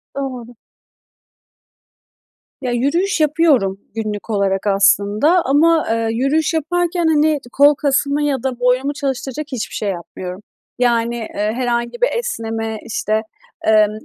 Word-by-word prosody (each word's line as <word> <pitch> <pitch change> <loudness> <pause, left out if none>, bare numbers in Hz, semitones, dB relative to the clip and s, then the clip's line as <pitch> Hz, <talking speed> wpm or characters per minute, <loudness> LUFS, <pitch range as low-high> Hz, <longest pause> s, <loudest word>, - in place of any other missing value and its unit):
Doğru. 250 -3 -5 2.1
Ya, 255 -2 -2
yürüyüş 315 +11 0
yapıyorum 290 - +2 0.2
günlük 215 -1 -4
olarak 200 -2 0
aslında 205 - +3
ama, 315 +4 +3
eee, 230 0 0
yürüyüş 275 +8 +1
yaparken, 345 +2 0
hani, 305 -1 +3
kol 285 +3 +5
kasımı 280 +1 +1
ya 275 -4 -1
da 260 -2 -2
boynumu 250 +3 +1
çalıştıracak 275 0 -3
hiçbir 250 -4 -4
şey 210 - -2
yapmıyorum. 180 +1 -6 0.4
Yani, 235 -1 +1
eee, 215 -2 -3
herhangi 240 - -2
bir - - +4
esneme, 225 - -3
işte, 220 -1 -1 0.5
emm 215 -1 +5
250 Hz, 120 wpm, -18 LUFS, 220-295 Hz, 2.1 s, kol